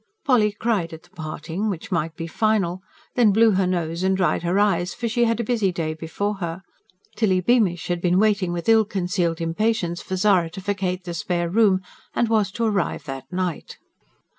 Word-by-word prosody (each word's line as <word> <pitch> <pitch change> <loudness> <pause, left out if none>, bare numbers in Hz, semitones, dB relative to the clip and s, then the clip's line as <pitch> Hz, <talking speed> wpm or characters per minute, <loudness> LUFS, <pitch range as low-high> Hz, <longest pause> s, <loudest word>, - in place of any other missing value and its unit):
Polly 230 -6 +4
cried 205 -6 -1
at 160 - -10
the 175 - -23
parting, 165 +3 -4
which 200 +3 -5
might 165 -2 -1
be 165 - -5
final; 190 -1 0 0.3
then 235 -4 +4
blew 225 +2 +5
her 190 -1 +2
nose 170 -2 -2
and 190 0 +2
dried 175 -5 +1
her 175 +2 0
eyes; 180 -4 +1
for 235 - -3
she 235 +1 +2
had 230 0 0
a - - 0
busy 220 -4 +1
day 165 -2 -2
before 180 +6 -3
her. 175 0 -5 0.5
Tilly 195 -5 +2
Beamish 185 -4 +2
had 175 -1 -2
been 180 0 +2
waiting 200 -3 +2
with 170 -1 -4
ill 225 -1 +6
concealed 180 -4 -1
impatience 175 +1 -1
for 190 - -4
Zara 185 -3 +3
to 175 - -8
vacate 185 -2 -2
the 175 -1 -5
spare 170 0 -2
room, 200 -2 +4 0.3
and 235 - +1
was 215 -3 +2
to 235 - -2
arrive 200 -6 0
that 135 -1 -8
night. 180 -3 -3
185 Hz, 195 wpm, -23 LUFS, 170-210 Hz, 0.5 s, ill